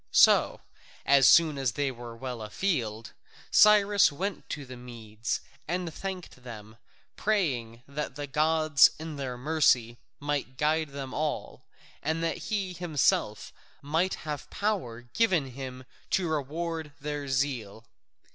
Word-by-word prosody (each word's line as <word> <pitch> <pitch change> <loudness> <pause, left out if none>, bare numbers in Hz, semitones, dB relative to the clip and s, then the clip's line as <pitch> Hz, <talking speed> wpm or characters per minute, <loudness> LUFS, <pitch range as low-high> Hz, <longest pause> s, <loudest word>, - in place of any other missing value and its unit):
So, - - +5 0.4
as 140 -1 +6
soon 155 -4 +6
as 130 -4 0
they 140 -2 0
were 120 -2 -9
well 125 -2 -5
afield, 115 - -2 0.4
Cyrus 205 -2 +6
went 190 +6 -4
to 145 -2 -5
the 125 0 -9
Medes 115 -2 -5 0.3
and 175 0 -2
thanked 185 -8 -6
them, 110 -2 -10 0.4
praying 125 - -1
that 140 -1 -4
the 145 0 -4
gods 155 0 +4
in 160 -1 -6
their 130 -3 -4
mercy 125 -5 +2 0.2
might 140 -3 -3
guide 155 +1 +1
them 135 -2 -6
all, 150 -1 -3 0.4
and 160 +2 -1
that 165 - 0
he 200 -4 -1
himself 155 -10 0 0.3
might 160 +6 +1
have 150 -4 -5
power 190 - -2
given 155 - +1
him 130 0 -7 0.3
to 185 -2 +1
reward 160 +1 -3
their 145 -1 -4
zeal. 125 -5 -2
145 Hz, 130 wpm, -28 LUFS, 125-165 Hz, 0.4 s, as